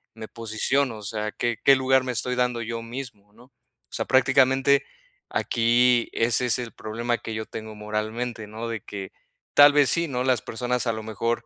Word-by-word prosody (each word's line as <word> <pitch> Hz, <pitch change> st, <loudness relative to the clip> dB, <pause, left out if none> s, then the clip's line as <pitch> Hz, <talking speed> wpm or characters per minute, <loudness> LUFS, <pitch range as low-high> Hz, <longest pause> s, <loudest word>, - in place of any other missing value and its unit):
me 110 Hz, -1 st, -8 dB
posiciono?" 115 Hz, +3 st, -1 dB
O 105 Hz, -, -11 dB
sea, 105 Hz, +1 st, -3 dB
¿qué 120 Hz, -2 st, -2 dB
qué 140 Hz, -, +7 dB
lugar 130 Hz, 0 st, +2 dB
me 130 Hz, -, -3 dB
estoy 125 Hz, +2 st, -2 dB
dando 125 Hz, -1 st, 0 dB
yo 115 Hz, 0 st, -4 dB
mismo? 115 Hz, -4 st, -9 dB
¿No?, 120 Hz, +3 st, -18 dB, 0.4 s
o -, -, -23 dB
sea, -, -, -2 dB
prácticamente, 135 Hz, +1 st, +3 dB, 0.4 s
aquí 120 Hz, +1 st, +2 dB
ese 120 Hz, +2 st, +2 dB
es 125 Hz, -, +2 dB
el 120 Hz, -2 st, -6 dB
problema 120 Hz, +2 st, -3 dB
que 115 Hz, -, -6 dB
yo 110 Hz, 0 st, -4 dB
tengo 110 Hz, 0 st, -8 dB
moralmente, 110 Hz, +2 st, -4 dB
¿no?, 110 Hz, +2 st, -6 dB
de 115 Hz, -3 st, -4 dB
que, 100 Hz, -2 st, -8 dB, 0.4 s
tal 145 Hz, 0 st, +8 dB
vez 145 Hz, -1 st, +4 dB
sí, 170 Hz, 0 st, +2 dB
¿no?, 125 Hz, -2 st, -2 dB
las 130 Hz, -2 st, +2 dB
personas 125 Hz, +1 st, -2 dB
a 115 Hz, -, +1 dB
lo 110 Hz, 0 st, -6 dB
mejor, 115 Hz, +2 st, -2 dB
120 Hz, 195 wpm, -24 LUFS, 110-125 Hz, 0.4 s, tal